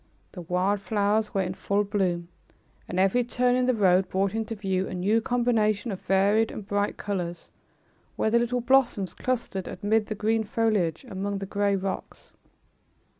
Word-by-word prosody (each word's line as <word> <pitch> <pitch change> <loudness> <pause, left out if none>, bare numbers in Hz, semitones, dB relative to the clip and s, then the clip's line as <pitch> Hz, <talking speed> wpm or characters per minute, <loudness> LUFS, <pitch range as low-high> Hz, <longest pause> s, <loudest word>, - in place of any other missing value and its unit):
The 180 - -8
wild 180 +4 0
flowers 210 +1 +1
were 195 - +2
in 180 0 -3
full 200 +2 0
bloom, 185 -4 -1 0.6
and 180 - -2
every 195 +6 +3
turn 245 +1 +1
in 255 0 +1
the 255 - +3
road 190 -3 +3
brought 195 +1 0
into 225 0 -3
view 190 -2 -1
a - - -5
new 205 +5 +2
combination 230 -2 +1
of 190 - -6
varied 200 +4 +3
and 200 - -8
bright 205 0 -1
colors, 175 -4 -4 0.6
where 220 - 0
the 235 - +4
little 240 +1 0
blossoms 240 -7 +2
clustered 235 -7 -3
amid 215 +1 0
the 215 - -3
green 220 +2 +1
foliage, 210 - 0
among 200 -1 -3
the 195 - -4
gray 200 0 0
rocks. 190 0 -5
205 Hz, 170 wpm, -26 LUFS, 190-225 Hz, 0.6 s, the